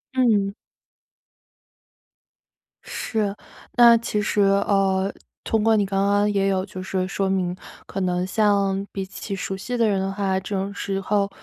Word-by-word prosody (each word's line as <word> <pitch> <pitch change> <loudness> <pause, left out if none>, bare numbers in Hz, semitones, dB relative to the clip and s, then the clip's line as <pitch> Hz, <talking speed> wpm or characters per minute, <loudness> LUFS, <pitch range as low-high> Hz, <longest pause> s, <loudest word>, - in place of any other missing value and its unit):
嗯。 210 -6 +3 2.3
是， 210 -3 -2 0.4
那 235 -1 +8
其 215 -2 -2
实， 205 0 +1
呃， 195 -1 +2 0.3
通 220 -1 +1
过 225 0 +4
你 205 - +2
刚 195 0 0
刚 205 +1 +3
也 195 -1 +1
有 190 0 0
就 185 -2 -8
是 185 -1 -2
说 195 0 -1
明， 180 -2 0 0.3
可 195 - -5
能 180 0 0
像 200 -1 +1
比 195 -1 -4
起 195 +1 -7
熟 195 0 -4
悉 245 +5 -4
的 230 -2 +3
人 195 -2 +1
的 195 0 -2
话， 195 -1 -1
这 190 +2 -7
种 195 +1 -2
时 195 -1 -3
候 200 0 0
195 Hz, 170 characters per minute, -23 LUFS, 190-205 Hz, 2.3 s, 那